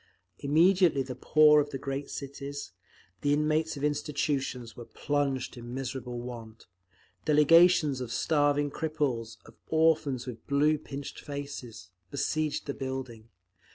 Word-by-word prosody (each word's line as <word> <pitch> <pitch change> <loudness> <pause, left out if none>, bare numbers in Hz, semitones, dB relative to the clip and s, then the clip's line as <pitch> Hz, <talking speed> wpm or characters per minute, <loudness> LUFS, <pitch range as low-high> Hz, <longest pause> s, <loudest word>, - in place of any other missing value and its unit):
Immediately 165 +1 +4
the 130 0 -6
poor 150 +3 +5
of 145 - -4
the 140 - -4
great 135 +1 -4
cities, 140 0 -6 0.5
the 145 0 +2
inmates 155 +1 +1
of 140 - -6
institutions, 145 -5 -2
were 120 - -8
plunged 140 0 -2
in 120 +1 -7
miserable 125 -2 -4
want: 115 -2 -9 0.6
delegations 150 -2 +5
of 120 -2 -5
starving 145 -1 +1
cripples, 145 -9 -2
of - - -15
orphans 160 -5 +2
with 115 -3 -9
blue, 150 +2 +3
pinched 140 0 -7
faces, 140 - -7 0.2
besieged 150 +1 -1
the 140 - -3
building. 130 -5 -6
140 Hz, 125 wpm, -29 LUFS, 130-150 Hz, 0.6 s, poor